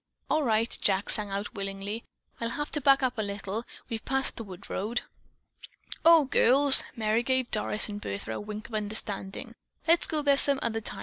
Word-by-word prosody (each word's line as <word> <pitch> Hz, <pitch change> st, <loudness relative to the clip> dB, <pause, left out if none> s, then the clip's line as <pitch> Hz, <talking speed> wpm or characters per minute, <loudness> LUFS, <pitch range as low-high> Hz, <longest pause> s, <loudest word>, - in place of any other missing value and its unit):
"All 310 Hz, -, +3 dB
right," 230 Hz, -3 st, +1 dB
Jack 195 Hz, 0 st, +1 dB
sang 210 Hz, -1 st, -2 dB
out 200 Hz, +3 st, -4 dB
willingly. 200 Hz, +2 st, -5 dB, 0.4 s
"I'll 230 Hz, -, -2 dB
have 295 Hz, +5 st, -4 dB
to 295 Hz, -, -3 dB
back 275 Hz, 0 st, +4 dB
up 255 Hz, -3 st, -1 dB
a -, -, +2 dB
little. 205 Hz, +2 st, -4 dB, 0.2 s
We've 225 Hz, -2 st, -5 dB
passed 270 Hz, 0 st, 0 dB
the 230 Hz, -, -6 dB
wood 185 Hz, -4 st, -11 dB
road." 225 Hz, +5 st, -2 dB, 1.0 s
"O, 330 Hz, -3 st, +7 dB
girls," 270 Hz, +2 st, +5 dB
Merry 220 Hz, 0 st, +1 dB
gave 260 Hz, 0 st, -1 dB
Doris 210 Hz, 0 st, +3 dB
and 205 Hz, -1 st, -7 dB
Bertha 100 Hz, -, -5 dB
a 110 Hz, -, -4 dB
wink 210 Hz, +1 st, -7 dB
of -, -, -16 dB
understanding, 205 Hz, -2 st, -1 dB, 0.3 s
"let's 335 Hz, +1 st, +4 dB
go 305 Hz, -2 st, -1 dB
there 280 Hz, -1 st, +4 dB
some 280 Hz, 0 st, +3 dB
other 225 Hz, -1 st, -2 dB
time. -, -, -4 dB
225 Hz, 190 wpm, -28 LUFS, 205-270 Hz, 1.0 s, O